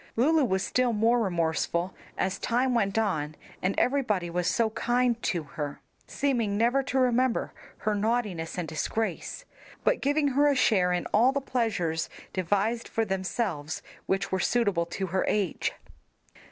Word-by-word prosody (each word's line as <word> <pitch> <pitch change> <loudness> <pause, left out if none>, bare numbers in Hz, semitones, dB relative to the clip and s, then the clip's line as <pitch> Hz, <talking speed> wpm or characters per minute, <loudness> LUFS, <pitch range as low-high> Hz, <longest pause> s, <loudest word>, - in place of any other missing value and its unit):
Lulu 300 +6 +4
was 190 -4 0
still 250 -2 +1
more 230 +3 +3
remorseful 170 -2 0 0.2
as 190 +1 -1
time 250 +2 +1
went 200 -3 +1
on 155 -9 0 0.3
and 185 +2 0
everybody 215 -10 +1
was 175 0 0
so 225 +1 +2
kind 240 +1 +1
to 170 -5 -1
her, 145 0 -5 0.3
seeming 235 -8 0
never 240 +5 +3
to 265 0 -2
remember 255 -1 +2 0.2
her 215 - -1
naughtiness 205 -6 -1
and 175 -2 -2
disgrace, 220 - -3 0.4
but - - +2
giving 290 +1 +2
her 285 +2 +3
a 285 - +3
share 195 -8 +3
in 180 -1 0
all 235 +5 +5
the 280 - 0
pleasures 210 -12 -1 0.2
devised 205 +5 0
for 225 -1 0
themselves 190 -5 -2 0.2
which 195 +1 0
were 190 - +1
suitable 200 -7 +1
to 190 +3 -3
her 190 +1 0
age. 200 -4 0
215 Hz, 155 wpm, -28 LUFS, 180-245 Hz, 0.4 s, all